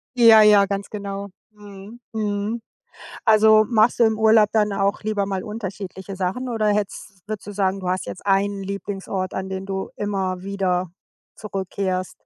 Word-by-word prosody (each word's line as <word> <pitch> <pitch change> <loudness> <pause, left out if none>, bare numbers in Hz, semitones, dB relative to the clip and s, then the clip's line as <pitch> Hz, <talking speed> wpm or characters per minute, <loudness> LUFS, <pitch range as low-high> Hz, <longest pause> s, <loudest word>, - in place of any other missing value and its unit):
Ja, 225 -3 +8
ja, 210 -2 +6
ganz 200 0 -4
genau. 200 -1 -5 0.2
Mhm, 205 +2 -12
mhm. 210 +1 -2 0.6
Also 215 0 +6
machst 230 +1 +3
du - - +6
im 220 -1 +1
Urlaub 220 -1 +5
dann 210 -2 +1
auch 200 +1 0
lieber 210 -2 -1
mal 195 -1 -3
unterschiedliche 195 -2 -7
Sachen 195 +8 -3
oder 220 -2 0
hättest 205 -2 -2
würdest 215 -2 -6
du - - -5
sagen, 195 -1 0
du 180 -1 -3
hast 185 +1 -1
jetzt - - -8
einen 200 0 +1
Lieblingsort, 195 -1 -4
an 190 0 -4
den 190 0 -5
du 190 -1 -4
immer 190 -3 -2
wieder 185 -2 -1 0.5
zurückkehrst? 190 -2 -3
200 Hz, 160 wpm, -22 LUFS, 190-215 Hz, 0.6 s, Ja